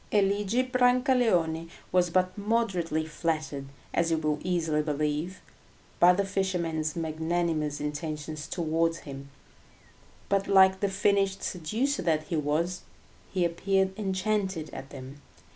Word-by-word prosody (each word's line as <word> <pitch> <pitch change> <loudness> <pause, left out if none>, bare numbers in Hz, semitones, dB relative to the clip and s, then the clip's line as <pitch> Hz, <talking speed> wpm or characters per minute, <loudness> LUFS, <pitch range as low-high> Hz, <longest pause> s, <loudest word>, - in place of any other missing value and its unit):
Eligi 205 +3 +2
Brancaleone 245 -10 +2 0.2
was 180 -1 +3
but 185 +1 +1
moderately 195 -7 0
flattered, 155 -3 -2 0.3
as 170 0 +2
you 165 - +2
will 155 -1 0
easily 165 -4 +1
believe, 150 +4 -2 0.6
by 175 - +8
the 195 +2 +1
fisherman's 170 -5 -1
magnanimous 160 -2 -1
intentions 150 +1 -4
towards 165 0 0
him; 140 -1 -9 1.0
but 195 0 +1
like 190 -1 +6
the 200 - +1
finished 195 0 +1
seducer 220 - -1
that 160 -3 +1
he 165 - -4
was, 155 +4 0 0.5
he 185 -2 +1
appeared 190 +3 +1
enchanted 190 -4 -1
at 135 - -8
them. 135 +2 -10
170 Hz, 120 wpm, -28 LUFS, 155-195 Hz, 1.0 s, by